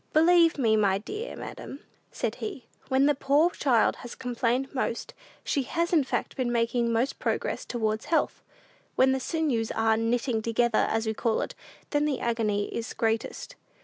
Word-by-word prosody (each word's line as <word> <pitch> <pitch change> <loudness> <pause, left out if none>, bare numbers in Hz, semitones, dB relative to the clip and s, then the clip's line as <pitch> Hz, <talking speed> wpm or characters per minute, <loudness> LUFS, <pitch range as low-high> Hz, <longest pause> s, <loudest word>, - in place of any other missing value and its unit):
"Believe 330 +1 +5
me, 225 -5 +3
my 200 -3 +3
dear 420 - -6
madam," 275 - -8 0.3
said - - -2
he, 385 - -5 0.2
"when 265 +1 +3
the 295 - +4
poor 285 +5 +3
child 250 -9 +2
has 240 - -9
complained 250 +1 -1
most, 255 -3 -2 0.3
she 285 - 0
has 335 +7 -1
in 310 -4 +5
fact - - -3
been 250 -2 -1
making 235 0 +1
most 230 +4 0
progress - - -2
towards 220 -2 -2
health. 325 - 0 0.5
When 265 0 +4
the 265 - +1
sinews 260 -7 -1
are 225 0 +2
'knitting 230 +1 0
together,' 230 0 +2
as 225 0 0
we 220 - 0
call 225 0 0
it, - - -4 0.4
then 290 0 +2
the 285 -4 0
agony 215 -3 -1
is 230 - -4
greatest." 225 0 -2
245 Hz, 170 wpm, -27 LUFS, 225-285 Hz, 0.5 s, Believe